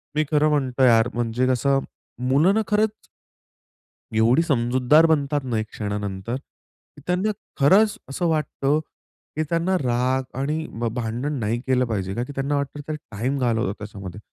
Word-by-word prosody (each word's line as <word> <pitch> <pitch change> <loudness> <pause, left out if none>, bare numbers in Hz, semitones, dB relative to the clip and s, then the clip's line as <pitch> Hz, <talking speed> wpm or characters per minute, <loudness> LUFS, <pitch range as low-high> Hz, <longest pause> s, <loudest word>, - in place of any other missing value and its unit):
मी 155 - +3
खरं 150 0 +4
म्हणतो 135 -3 +1
यार 115 -2 +5
म्हणजे 120 +1 0
कसं? 135 +2 +2 0.5
मुलं 155 +9 +4
ना 220 - +3
खरंच. 215 +1 +2 1.3
एवढी 120 +7 +4
समजूतदार 130 +2 +3
बनतात 145 -2 +1
ना, 125 -3 -2
एक 110 - -3
क्षणानंतर. 105 +1 -4 0.7
त्यांना 180 +4 +1 0.3
खरंच 205 - +5
असं 170 +6 -1
वाटतं 150 -2 0 0.6
की 155 - 0
त्यांना 170 +3 +1
राग 130 -1 0 0.2
आणि 155 +4 -1
भ 120 - -1
भांडण 120 +4 -2
नाही 115 +1 -1
केलं 130 -1 +3
पाहिजे. 95 -5 -3
का 120 - -1
की 145 - -8
त्यांना 140 +2 -1
वाटतं 140 +1 -3
त्या 155 - -2 0.2
टाईम 120 +7 -1
घालवतात 115 -5 +1
त्याच्यामध्ये 100 -2 -8
130 Hz, 150 wpm, -23 LUFS, 115-150 Hz, 1.3 s, यार